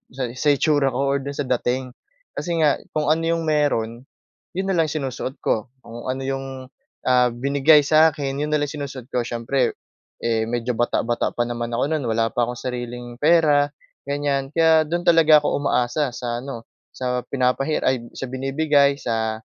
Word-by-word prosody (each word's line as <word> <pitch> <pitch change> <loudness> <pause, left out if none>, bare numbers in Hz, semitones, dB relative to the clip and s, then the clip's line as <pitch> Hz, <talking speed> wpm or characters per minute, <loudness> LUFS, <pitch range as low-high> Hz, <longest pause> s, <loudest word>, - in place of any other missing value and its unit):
sa 130 +2 -3
itsura 145 0 +3
ko 135 +1 +1
or 140 - +2
doon 140 +1 -6
sa 145 - -1 0.2
dating. 130 +1 -2 0.4
Kasi 170 -1 -3
nga 145 -2 +3 0.2
kung 150 -1 +2
ano 160 - +2 0.2
yung 165 - -3
mayro'n, 145 -7 0 0.6
'yon 190 +1 -2
na 185 - 0
lang 160 - +3
sinusuot 135 -3 -4
ko. 110 0 0 0.2
Kung 120 +2 -9
ano 130 +1 -2
yung, 135 0 -3 0.6
ah, 125 -1 +4
binigay 140 +4 +4
sa 155 +2 +5
akin, 140 -2 -3
'yon 150 - -1
na 150 - +1
lang 145 - -3
sinusuot 135 -4 -7
ko. 120 -1 -1
Siyempre, 120 +2 -1 0.5
eh, 115 -1 0
medyo 120 +1 -1
bata-bata 120 0 -1
pa 120 - +1
naman 120 0 -4
ako 120 - +1
noon 150 -6 -1
wala 115 0 +1
pa 120 +1 0
akong 125 - -4
sariling 120 -1 -6
pera, 150 -2 +4 0.4
ganyan. 140 -1 -1
Kaya 160 -1 +4
doon 175 +2 -2
talaga 160 -3 +6
ako - - 0
umaasa 125 -1 0
sa 120 -1 -3
ano 125 -3 -7 0.3
sa 125 -1 -1
pinapahiram 135 +3 0
ay - - +1 0.2
sa - - -6
binibigay, 140 +2 +2
sa 110 -4 -2
135 Hz, 175 wpm, -22 LUFS, 120-150 Hz, 0.6 s, talaga